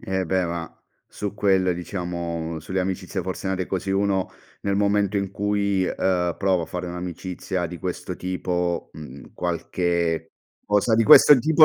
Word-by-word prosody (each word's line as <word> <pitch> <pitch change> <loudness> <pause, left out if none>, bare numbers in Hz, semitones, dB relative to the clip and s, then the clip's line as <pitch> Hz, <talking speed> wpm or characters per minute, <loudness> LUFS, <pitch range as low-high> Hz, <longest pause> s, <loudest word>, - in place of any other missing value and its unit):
Eh 95 -1 -1
beh, 95 +1 +1
ma 85 -1 -4 0.4
su 105 -1 -4
quelle, 95 -3 +2
diciamo 85 -3 -4
sulle 95 +4 -3
amicizie 95 +1 -3
forse 95 +1 -4
nate 95 -1 -1
così 95 +1 -3
uno 95 -1 +1 0.3
nel 100 -1 0
momento 100 0 +2
in 100 -1 -1
cui, 100 -1 +1
uhm, 90 -2 0
prova 95 -3 +2
a - - -5
fare 90 0 -5
un'amicizia 90 +1 -4
di 85 0 -8
questo - - -4
tipo, 90 -1 -2
mhmm, 70 -4 -11
qualche 85 -1 -1 0.3
cosa 105 +2 +2
di 115 - +4
questo 150 +2 +9
tipo, 155 +4 +6
95 Hz, 155 wpm, -24 LUFS, 85-100 Hz, 0.4 s, questo